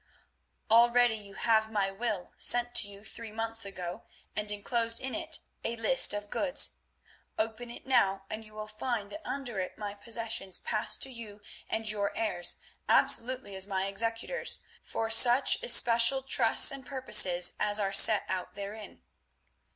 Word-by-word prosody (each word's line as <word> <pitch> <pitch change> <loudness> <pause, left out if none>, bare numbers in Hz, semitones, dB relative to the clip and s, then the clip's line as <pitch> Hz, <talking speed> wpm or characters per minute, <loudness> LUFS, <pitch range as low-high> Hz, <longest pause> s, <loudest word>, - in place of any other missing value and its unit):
"Already 240 +1 +4
you 205 -2 -11
have 220 -1 +1
my 200 -2 -1
will 205 -2 -5
sent 245 0 +1
to 205 - +4
you 200 0 -13
three 230 0 -9
months 225 0 -4
ago, 180 -3 -7 0.3
and 210 0 -1
enclosed 230 +2 -2
in 260 0 -5
it - - -3 0.2
a 230 - -2
list 230 +3 +3
of 205 0 -4
goods. 285 -1 +1 0.6
Open 225 +2 -4
it 235 - -12
now 195 -7 +1
and 215 +2 -5
you 215 0 -17
will 215 0 -7
find 215 -1 -5
that 310 - -8
under 250 -7 -5
it 185 - -6
my 205 -1 -6
possessions 225 -3 -3
pass 215 -2 -1
to 270 - -2
you 220 -4 -10 0.3
and 220 0 -3
your 200 -1 -4
heirs 180 -6 0 0.3
absolutely 250 -4 +2
as 190 +1 -3
my 190 -1 -2
executors, 230 - -3 0.2
for 225 0 -5
such 245 - +5
especial 260 - +4
trusts 270 - +4
and 275 -2 -10
purposes 185 -10 +4
as 210 0 0
are 195 -1 -2
set 210 +1 +7
out 185 -1 -5
therein. 200 +1 -9
220 Hz, 160 wpm, -29 LUFS, 200-235 Hz, 0.6 s, set